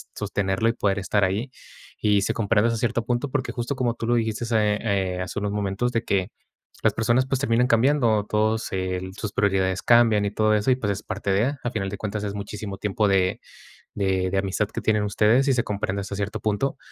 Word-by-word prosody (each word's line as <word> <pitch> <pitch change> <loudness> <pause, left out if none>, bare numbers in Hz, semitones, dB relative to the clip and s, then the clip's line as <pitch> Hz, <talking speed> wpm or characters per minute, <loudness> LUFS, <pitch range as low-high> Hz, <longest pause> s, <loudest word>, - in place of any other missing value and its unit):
sostenerlo 100 +3 0
y - - +1
poder 100 -4 0
estar 100 +1 +1
ahí". 105 +8 -2 0.5
Y 105 -1 +3
se 100 - 0
comprende 110 0 +2
hasta 115 0 0
cierto 120 0 0
punto, 120 +3 -1
porque 130 -1 -2
justo 120 +3 -3
como 125 -3 0
tú 115 - -4
lo 120 - +3
dijiste, 115 0 -1
eh 105 -1 +2 0.4
eh, - - -3
hace 95 +3 -4
unos 105 0 -2
momentos, 105 +4 -1
de 115 -2 -1
que 95 -1 0 0.5
las - - +3
personas, 120 +3 +2
pues, 135 0 -1
terminan 125 -2 +2
cambiando. 115 -3 +3
Todos 110 +1 0
el 95 0 -3
sus 105 -1 -5
prioridades 95 -2 +1
cambian 115 -3 +5
y 100 - -1
todo 110 +1 +2
eso, 105 +4 +2
y 125 - +3
pues, 105 -5 -1
es 100 - -8
parte 100 - -3
de 115 +9 +1
Al 120 - -2
final 95 -3 -2
de 100 - -6
cuentas, 105 +1 -4
es 100 -1 -3
muchísimo 100 0 -6
tiempo 105 +1 0
de 95 -1 +1 0.5
de 95 -2 0
de 95 - 0
amistad 95 +2 0
que - - -5
tienen 105 -1 +1
ustedes, 110 +6 +3
y 135 - +4
se 120 -2 +1
comprende 100 -1 -2
hasta 100 0 -5
cierto 100 0 -3
punto. 110 +6 -1
105 Hz, 220 wpm, -24 LUFS, 100-115 Hz, 0.5 s, cambian